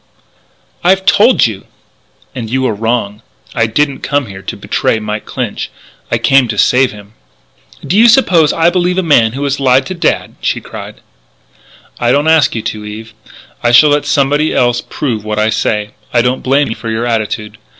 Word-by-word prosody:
"I've 190 +2 +2
told 230 +7 +4
you!" 105 -4 -5 0.7
"And 115 -4 -6
you 130 +2 -1
are 115 - 0
wrong. 110 -1 -2 0.3
I 115 -1 +1
didn't 140 +4 0
come 145 -1 -1
here 95 -3 -10
to 95 - -6
betray - - -1
Mike 105 0 -5
Clinch: - - -4 0.4
I 120 - +1
came 130 +2 +3
to 110 -2 -4
save 125 +4 +3
him." 105 0 -14 0.7
"Do 185 - -1
you 225 +3 +6
suppose 185 - +4
I 165 +1 +2
believe 180 0 0
a 190 - +1
man 115 -9 +3
who 140 +2 -4
has 140 0 -1
lied 130 0 +3
to 185 - -5
Dad?" 170 - -1
she - - -1
cried. - - -10 1.0
"I 120 0 +1
don't 145 +4 +1
ask 160 -6 +3
you 110 - -3
to, 105 -1 -5
Eve. 110 +2 -9 0.5
I 120 - +1
shall 145 +5 +6
let 145 0 +1
somebody 145 +2 +1
else 120 -1 +1
prove 115 -7 -4
what 105 0 -4
I 110 +1 +1
say. 105 -1 -1 0.2
I 120 -1 +2
don't 125 +1 -1
blame 140 +1 +1
you 110 - -3
for 115 - -7
your 110 +1 -2
attitude. 110 -2 -3
125 Hz, 190 wpm, -13 LUFS, 110-145 Hz, 1.0 s, you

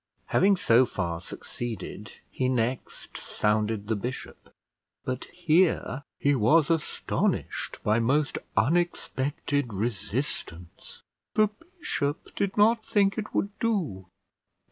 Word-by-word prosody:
Having 195 +1 +5
so 125 -7 +4
far 85 -5 -3
succeeded, 110 +1 -6 0.2
he 130 -1 0
next 125 0 -2
sounded 105 0 0
the 110 - +1
bishop; 125 +5 -6 0.5
but 130 0 -3
here 165 -5 +2 0.2
he 145 - +3
was 145 +7 +4
astonished 165 -3 -1
by 105 +2 +3
most 145 +6 +1 0.2
unexpected 145 -5 0
resistance. 100 - -4 0.3
The 215 -1 +5 0.3
bishop 145 - -2
did 200 0 -1
not 220 +2 +5
think 200 -2 +2
it 220 - -6
would 200 - +1
do. 165 - -1
130 Hz, 105 wpm, -27 LUFS, 110-175 Hz, 0.5 s, Having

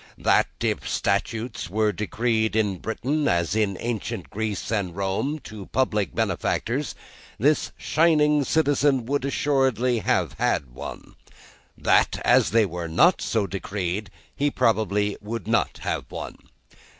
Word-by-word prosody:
That, - - +3
if - - -1
statues 110 -1 -1
were 105 +2 +1
decreed 110 +2 0
in 105 -4 +1
Britain, 140 +7 -1
as 85 +2 +1
in 105 -4 +1
ancient 115 -4 -4
Greece 110 -1 -3
and 100 -6 -1
Rome, 100 +10 -1
to 105 -3 -9
public 105 - 0
benefactors, 135 +6 -1 0.4
this 145 +7 +2
shining 150 -2 +3
citizen 145 -4 +2
would 140 +2 -1
assuredly 130 -4 +1
have - - 0
had 65 -3 0
one. 65 - -8 0.6
That, - - +3
as - - +5
they 115 -1 +4
were 85 -2 -5
not 130 - +4
so 110 -3 0
decreed, 95 0 -3 0.3
he 145 +1 +1
probably 105 -5 +1
would 105 -2 -5
not - - +1
have - - -3
one. - - -7
110 Hz, 130 wpm, -24 LUFS, 100-135 Hz, 0.6 s, as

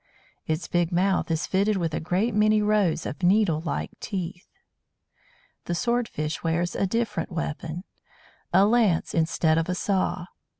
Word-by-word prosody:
Its 160 +2 -2
big 175 0 0
mouth 185 +1 +1
is 160 0 0
fitted 200 +2 +1
with 165 -4 -1
a - - -1
great 185 +8 0
many 215 +1 +4
rows 210 -6 +1
of 145 - -5
needle 180 -4 +3
like 170 - -3
teeth. 180 -3 -5 1.2
The 175 - -2
Sword 235 +5 0
fish 150 +1 -4
wears 170 +1 0
a 195 - +1
different 230 0 -2
weapon 165 +1 -4 0.7
a 195 - +5
lance 215 -6 +2
instead 160 -1 +2
of 165 - -2
a 180 - 0
saw. 185 -2 -1
180 Hz, 155 wpm, -25 LUFS, 165-205 Hz, 1.2 s, a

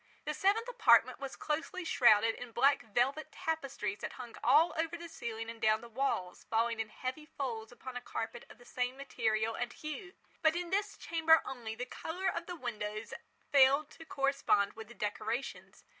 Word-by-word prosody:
The - - -1
seventh 415 +5 +2
apartment - - +5
was 275 -1 -5
closely 325 +4 -3
shrouded 225 -6 +5
in 245 -1 -9
black 280 +4 +4
velvet 245 +7 0
tapestries 270 -10 -3
that - - -5
hung 240 -2 -9
all 330 +3 +5
over 325 +1 -1
the 340 0 -8
ceiling 225 -8 -5
and 230 0 -8
down 215 0 +3
the 235 - -10
walls, 230 -7 -2
falling 230 0 +1
in 220 -1 -2
heavy 260 +7 -5
folds 235 -7 -4
upon 250 +1 -9
a 245 - -3
carpet 235 0 -5
of - - -14
the 245 - -17
same 250 +1 -2
material 225 -5 0
and 245 +1 -3
hue. 310 +5 -7 0.3
But 315 -1 +4
in 350 0 -3
this 405 +1 0
chamber 325 -1 +4
only, 235 -4 -5
the 250 - -4
colour 345 +8 -3
of 340 - -4
the 355 - -4
windows 215 -6 -4 0.4
failed 280 +2 +5
to 325 - -12
correspond 275 -9 +2
with 220 -1 -9
the 235 - -13
decorations. 215 +5 -4
255 Hz, 185 wpm, -33 LUFS, 225-315 Hz, 0.4 s, apartment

